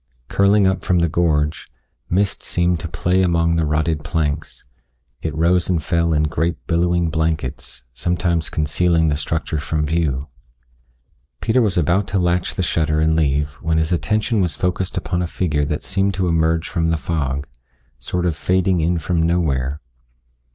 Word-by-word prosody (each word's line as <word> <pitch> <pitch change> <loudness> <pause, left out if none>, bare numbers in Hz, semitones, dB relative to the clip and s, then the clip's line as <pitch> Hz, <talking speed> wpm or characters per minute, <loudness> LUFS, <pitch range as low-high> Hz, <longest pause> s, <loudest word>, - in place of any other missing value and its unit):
Curling 100 +1 +4
up 95 -1 +1
from 90 - +1
the 85 0 +3
gorge, 75 -2 0 0.4
mist 100 +2 +1
seemed 85 -1 0
to 85 - -5
play 90 +3 +1
among 85 -2 +2
the 80 -2 +1
rotted 75 0 0
planks; 75 -2 -3 0.6
it 80 - -2
rose 85 +3 +2
and 85 -4 +1
fell 85 +2 +1
in 75 -1 +2
great 80 +2 -1
billowing 85 0 +1
blankets, 80 -6 -3
sometimes 85 +2 -1
concealing 80 +2 +1
the 75 - +1
structure 80 +1 -2
from 75 +1 -1
view. 75 -4 -1 1.1
Peter 120 - +2
was 105 -6 +1
about 85 +4 +2
to 100 - -1
latch 90 -1 0
the 95 - -1
shutter 75 -3 +1
and 80 0 +2
leave 75 -1 +1
when 80 0 0
his 80 +1 0
attention 105 - +1
was 85 -5 0
focused 90 +2 -2
upon 90 - -1
a 90 - -1
figure 75 -4 -1
that 75 +1 -3
seemed 95 0 0
to 95 -1 0
emerge 80 0 +1
from 85 -3 0
the 80 - +1
fog 70 -4 -2 0.5
sort 90 +8 -2
of 85 -3 0
fading 90 +1 +1
in 85 +2 +1
from 80 +1 0
nowhere. 75 -5 0
85 Hz, 165 wpm, -20 LUFS, 75-90 Hz, 1.1 s, Curling